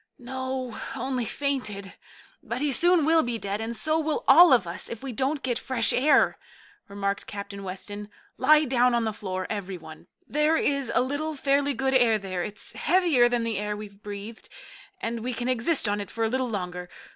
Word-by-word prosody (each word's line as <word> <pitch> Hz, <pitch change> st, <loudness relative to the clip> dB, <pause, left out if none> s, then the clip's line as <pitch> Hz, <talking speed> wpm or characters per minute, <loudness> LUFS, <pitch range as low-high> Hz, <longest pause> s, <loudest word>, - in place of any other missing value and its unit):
"No, 260 Hz, -1 st, -5 dB, 0.2 s
only 255 Hz, -1 st, -2 dB
fainted. 215 Hz, -9 st, -3 dB, 0.5 s
But 235 Hz, -, -4 dB
he 290 Hz, +1 st, 0 dB
soon 345 Hz, +3 st, +3 dB
will 325 Hz, +1 st, +5 dB
be 240 Hz, -3 st, -2 dB
dead, 200 Hz, 0 st, -3 dB
and 230 Hz, +1 st, -3 dB
so 310 Hz, +5 st, +1 dB
will 310 Hz, -1 st, -1 dB
all 335 Hz, +4 st, +9 dB
of 240 Hz, -8 st, +5 dB
us, 170 Hz, +4 st, -5 dB
if 230 Hz, +2 st, -7 dB
we 270 Hz, -, -4 dB
don't 270 Hz, +5 st, -1 dB
get 245 Hz, -2 st, 0 dB
fresh 245 Hz, -3 st, +1 dB
air," 285 Hz, +5 st, +3 dB, 0.5 s
remarked 200 Hz, 0 st, -3 dB
Captain 200 Hz, -1 st, -7 dB
Weston. 205 Hz, +2 st, -6 dB, 0.3 s
"Lie 305 Hz, +3 st, +5 dB
down 250 Hz, -2 st, +3 dB
on 235 Hz, -, +1 dB
the 220 Hz, -1 st, -1 dB
floor, 185 Hz, -3 st, -4 dB
every 195 Hz, -3 st, -4 dB
one. 160 Hz, 0 st, -13 dB, 0.2 s
There 300 Hz, +3 st, +2 dB
is 280 Hz, -6 st, 0 dB
a -, -, +5 dB
little 290 Hz, +4 st, -2 dB
fairly 280 Hz, 0 st, +1 dB
good 265 Hz, +3 st, 0 dB
air 240 Hz, -4 st, +4 dB
there. 190 Hz, -3 st, -4 dB
It's 210 Hz, +4 st, -5 dB
heavier 290 Hz, -1 st, +3 dB
than 240 Hz, -1 st, 0 dB
the 225 Hz, -3 st, -2 dB
air 210 Hz, 0 st, -3 dB
we've 205 Hz, -1 st, -10 dB
breathed, 205 Hz, +2 st, -8 dB, 0.5 s
and 230 Hz, +1 st, -3 dB
we 245 Hz, +2 st, -3 dB
can 245 Hz, +1 st, -3 dB
exist 255 Hz, +2 st, +2 dB
on 205 Hz, 0 st, 0 dB
it 200 Hz, -, -7 dB
for 230 Hz, -, -3 dB
a 220 Hz, -, +1 dB
little 260 Hz, +1 st, -1 dB
longer. 180 Hz, -4 st, -5 dB
240 Hz, 195 wpm, -26 LUFS, 205-270 Hz, 0.5 s, all